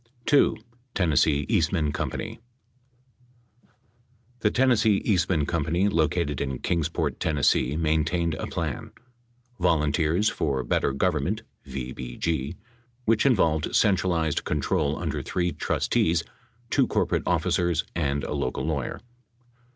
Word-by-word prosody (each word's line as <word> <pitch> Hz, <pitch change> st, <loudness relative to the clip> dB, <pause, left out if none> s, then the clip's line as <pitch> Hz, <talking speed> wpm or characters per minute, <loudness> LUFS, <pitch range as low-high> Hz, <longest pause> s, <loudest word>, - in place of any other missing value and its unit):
2. 145 Hz, -, +4 dB, 0.4 s
TENNESSEE 75 Hz, -5 st, +2 dB
EASTMAN 75 Hz, -3 st, +1 dB
CO. -, -, -2 dB, 2.3 s
The 105 Hz, -, +2 dB
Tennessee 110 Hz, -4 st, +3 dB
Eastman 90 Hz, -6 st, +2 dB
Co., 85 Hz, +3 st, -1 dB
located 80 Hz, -2 st, +1 dB
in 65 Hz, -2 st, -2 dB
Kingsport, 80 Hz, -1 st, -1 dB
Tenn., 80 Hz, -, 0 dB, 0.4 s
main 80 Hz, -1 st, +2 dB
tained 85 Hz, +1 st, -1 dB
a -, -, -3 dB
plan: -, -, -4 dB, 0.7 s
Volunteers 80 Hz, +2 st, +2 dB
for 70 Hz, -9 st, 0 dB
Better -, -, +1 dB
Government 90 Hz, +8 st, 0 dB, 0.2 s
(VBG), 65 Hz, +4 st, -3 dB, 0.5 s
which 115 Hz, +4 st, +3 dB
involved 80 Hz, -, +2 dB
centralized 90 Hz, -6 st, +2 dB
control 75 Hz, 0 st, 0 dB
under -, -, -3 dB
three 90 Hz, -1 st, -1 dB
trustees, 85 Hz, 0 st, +1 dB, 0.5 s
two -, -, +3 dB
corporate -, -, 0 dB
offi -, -, +1 dB
cers 85 Hz, -2 st, +1 dB
and 70 Hz, -3 st, 0 dB
a -, -, -3 dB
local 65 Hz, -, -2 dB
lawyer. 75 Hz, -5 st, -3 dB
80 Hz, 110 wpm, -26 LUFS, 75-90 Hz, 2.3 s, 2